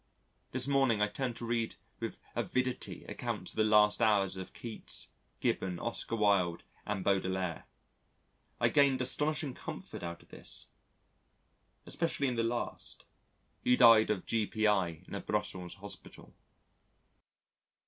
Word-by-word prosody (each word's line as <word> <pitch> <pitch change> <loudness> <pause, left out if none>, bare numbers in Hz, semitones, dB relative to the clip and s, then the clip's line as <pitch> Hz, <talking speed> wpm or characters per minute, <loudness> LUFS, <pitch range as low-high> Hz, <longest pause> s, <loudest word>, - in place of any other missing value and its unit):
This 130 +1 0
morning 135 -6 +3
I 105 - +3
turned 120 +3 -3
to 120 - -5
read 115 -1 -1 0.2
with - - -4 0.2
avidity 125 0 -1
accounts - - -3
of - - -14
the 110 - +4
last 105 0 +5
hours 100 -4 +3
of 95 -1 -6
Keats, 115 -2 -4 0.3
Gibbon, 90 -2 0
Oscar 115 +2 -2
Wilde 100 -6 +2 0.2
and 100 -2 -2
Baudelaire. 95 -3 0 0.9
I - - +4
gained 140 -2 +4
astonishing 150 +2 +2
comfort - - -7
out 85 0 -6
of - - -25
this, - - -4 1.2
especially 165 -4 -1
in 125 - -1
the 115 - +1
last... 120 +1 -2 0.6
who 125 0 +4
died 115 -3 +8
of 105 -4 -1
G.P.I. 105 -6 +1
in - - -10
a - - -3
Brussels 90 -2 -2
Hospital. 100 +1 -8
110 Hz, 130 wpm, -32 LUFS, 95-125 Hz, 1.2 s, died